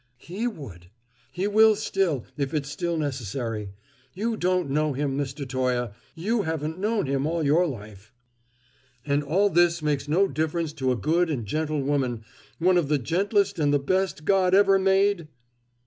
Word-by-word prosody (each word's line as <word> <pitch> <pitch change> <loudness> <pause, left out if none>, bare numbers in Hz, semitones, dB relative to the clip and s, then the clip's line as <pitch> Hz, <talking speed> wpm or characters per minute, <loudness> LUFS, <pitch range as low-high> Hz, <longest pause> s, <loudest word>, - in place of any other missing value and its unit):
"He 190 - -4
would; 105 - -8 0.4
he 185 +3 -2
will 215 +1 +5
still, 195 - -1
if 140 +1 -2
it's 145 -1 -2
still 170 +3 -2
necessary. 120 -6 -3 0.5
You 225 +4 -1
don't 180 -6 0
know 150 +1 +1
him, 140 0 -2
Mr. 140 0 -4
Toye; 125 -2 -1 0.2
you 210 +7 0
haven't 160 -1 -3
known 210 -1 0
him 135 +1 -1
all 165 0 -1
your 165 +5 +3
life." 105 - -9 0.9
"And 145 0 +1
all 190 +8 +2
this 170 -2 +3
makes 145 -2 -1
no 180 +7 +3
difference 160 +1 -2
to 130 -4 -1
a - - +1
good 165 - +1
and 130 -8 -2
gentle 155 +4 -2
woman 130 -5 -1 0.3
one 180 +1 +3
of 160 - -1
the 150 +1 +2
gentlest 190 - 0
and 145 -2 +2
the 145 - +4
best 185 +2 -1
God 190 -2 +3
ever 195 -1 +5
made?" 195 -2 +2
155 Hz, 165 wpm, -25 LUFS, 135-185 Hz, 0.9 s, will